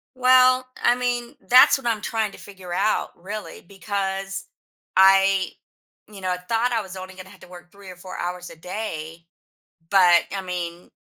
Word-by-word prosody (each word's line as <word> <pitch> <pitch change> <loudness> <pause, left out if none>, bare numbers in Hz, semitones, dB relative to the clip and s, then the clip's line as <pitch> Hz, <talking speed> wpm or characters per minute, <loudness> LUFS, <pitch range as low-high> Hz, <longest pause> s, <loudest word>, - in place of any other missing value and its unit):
Well, 255 0 +5 0.2
I 240 - +4
mean, 245 +1 -3
that's 250 +3 +7
what 270 -3 -6
I'm 225 -3 0
trying 220 -2 -2
to - - -13
figure 190 -3 -10
out, 200 +4 0
really, 205 +4 -8
because, 195 0 -4 0.5
I 195 0 +5 0.6
you 200 -2 -11
know, 185 - -2
I 180 - -1
thought 225 +7 -1
I 230 - 0
was 190 -2 -10
only 185 0 -9
going 185 0 -10
to 190 - -15
have 185 - -18
to - - -14
work 175 -1 -14
3 200 -2 -12
or - - -11
4 185 +1 -9
hours 180 0 -5
a - - -12
day, 165 -3 -7 0.7
but, 180 -3 +6
I - - -2
mean, 175 -1 -6
195 Hz, 185 wpm, -23 LUFS, 180-220 Hz, 0.7 s, that's